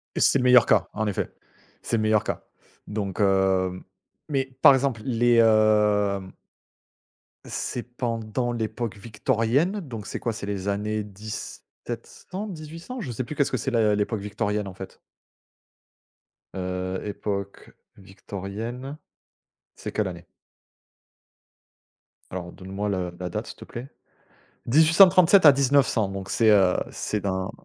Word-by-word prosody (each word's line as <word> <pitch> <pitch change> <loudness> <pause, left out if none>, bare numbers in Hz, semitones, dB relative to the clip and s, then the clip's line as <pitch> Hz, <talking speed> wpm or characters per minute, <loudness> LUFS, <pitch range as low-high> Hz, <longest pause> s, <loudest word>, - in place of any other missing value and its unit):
Et - - -1
c'est 140 - +4
le 125 - 0
meilleur 125 -1 +7
cas, - - +3
en 110 +1 -2
effet, 100 - -2 0.5
c'est 115 - -1
le 110 - 0
meilleur 110 -1 +2
cas - - -4 0.4
donc 105 -2 -4
heu, 95 -2 +2 0.5
mais 135 -2 0 0.2
par - - +10
exemple 130 -4 0
les, 120 -1 +2
hem 105 -3 +3 1.1
C'est 120 - -4
pendant 120 -1 -3
l'époque 115 -2 -3
victorienne, 120 - 0
donc 115 - -8
c'est - - -4
quoi, 115 - -2
c'est 110 -2 -6
les 100 -1 -4
années 105 +1 -1
1700 110 - -8
1800, 165 +8 -8
je 130 - -5
sais 120 - -3
plus, 150 - -7
qu'est-ce 140 -2 +1
que - - +2
c'est 135 +4 -2
la 110 -3 +3
l'époque 105 +1 -1
victorienne 105 0 -2
en 95 - -8
fait. 95 0 -10 1.6
Heu, 95 0 -3
époque 100 -1 -5 0.3
victorienne, 105 +8 -7 0.8
c'est - - -6
quelle 105 -2 0
année? 85 -2 -8 2.0
Alors 90 -1 -6
donne 95 0 -11
moi 105 +1 -2
le 90 -2 -2
la 90 -1 -4
date - - -4
s'il - - -9
te - - -11
plaît, 120 +3 -8 0.8
1837 175 - +6
à 145 - +11
1900 135 -5 +2
donc 95 0 -6
c'est, 115 -1 +3
heu, 95 -4 +5 0.2
c'est 105 - -3
dans, 95 -1 -2
110 Hz, 140 wpm, -25 LUFS, 100-125 Hz, 2.0 s, à